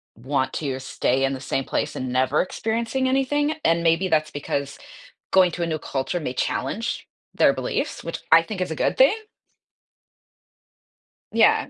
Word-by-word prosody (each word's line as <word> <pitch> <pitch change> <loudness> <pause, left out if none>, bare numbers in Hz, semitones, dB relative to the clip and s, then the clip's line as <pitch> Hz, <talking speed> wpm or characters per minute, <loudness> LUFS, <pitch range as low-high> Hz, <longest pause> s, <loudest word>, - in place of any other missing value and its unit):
want 130 +3 -1
to 135 -4 -3
stay 130 0 0
in 135 - 0
the 130 - -6
same 135 - -2
place - - -2
and 130 -1 -3
never 130 +3 +2
experiencing 230 +6 -1
anything, 290 +3 +1
and 165 0 +3
maybe 165 +3 +3
that's 155 -3 +1
because 140 -1 -3 0.5
going 185 -2 +5
to 170 +1 -3
a 170 - -1
new 155 -1 -2
culture 135 +6 -2
may 135 -6 -4
challenge - - -2 0.3
their - - +4
beliefs, - - -3
which - - -5
I 165 +1 +9
think 195 +3 -6
is 180 - -2
a - - -2
good - - 0
thing. 270 +10 +6 2.2
Yeah. - - +4
160 Hz, 165 wpm, -23 LUFS, 135-195 Hz, 2.2 s, I